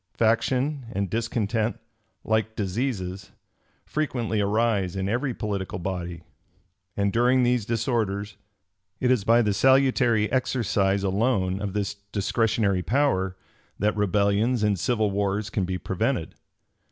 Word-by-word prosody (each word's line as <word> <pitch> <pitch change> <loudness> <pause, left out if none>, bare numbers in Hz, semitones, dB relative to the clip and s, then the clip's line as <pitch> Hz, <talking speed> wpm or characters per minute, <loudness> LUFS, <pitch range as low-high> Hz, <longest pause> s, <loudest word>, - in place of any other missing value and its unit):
Faction 125 +4 +1
and 100 -2 -2
discontent, 115 -1 -1 0.5
like 110 0 0
diseases, 100 -2 -3 0.6
frequently 120 -8 -1
arise 100 -3 +1
in 95 0 -2
every 125 +6 0
political 100 -5 -3
body; 90 -2 -5 0.7
and 100 -1 +1
during 125 +2 +3
these 120 -3 +1
disorders, 110 -4 -1 0.6
it 125 - +2
is 125 -6 +2
by 115 +3 +4
the 105 -2 +1
salutary 125 -3 +3
exercise 100 -6 +1
alone 100 -1 +1
of 100 -2 -3
this 105 -1 -1 0.2
discretionary 105 -2 +1
power, 95 -6 +1 0.4
that 105 +2 +1
rebellions 105 +3 +1
and 105 -3 +1
civil 110 -1 +1
wars 100 +1 -1
can 95 - 0
be 90 0 -2
prevented. - - -2
105 Hz, 120 wpm, -25 LUFS, 100-120 Hz, 0.7 s, by